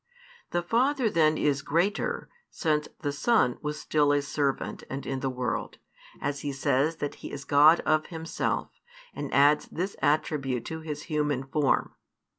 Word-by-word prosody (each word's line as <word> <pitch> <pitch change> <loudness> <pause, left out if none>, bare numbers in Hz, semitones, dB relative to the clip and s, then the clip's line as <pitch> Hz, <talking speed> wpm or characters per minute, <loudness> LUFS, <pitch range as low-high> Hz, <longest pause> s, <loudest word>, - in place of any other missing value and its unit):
The 175 0 -1
Father 250 +4 +2
then 155 -1 +3
is 140 -2 +1
greater 170 +8 0 0.2
since 150 -2 0
the 145 - -1
Son 145 - +2
was 150 0 -3
still 150 -2 +2
a 145 0 +2
servant 140 -1 -2
and 135 +1 -5
in 135 -1 -2
the 135 - -1
world, 125 -2 -3 0.4
as 140 0 -2
He 145 - -3
says 140 +3 +1
that 145 -2 -4
He - - -7
is 140 0 -7
God 150 +4 +6
of 155 0 +1
Himself, 160 -1 -2 0.4
and - - -5
adds 145 +2 +4
this 185 +4 -4
attribute 145 -5 0
to 160 - -5
His 150 -2 -6
human 150 -4 -1
form. 140 +1 +1
150 Hz, 160 wpm, -28 LUFS, 140-160 Hz, 0.4 s, God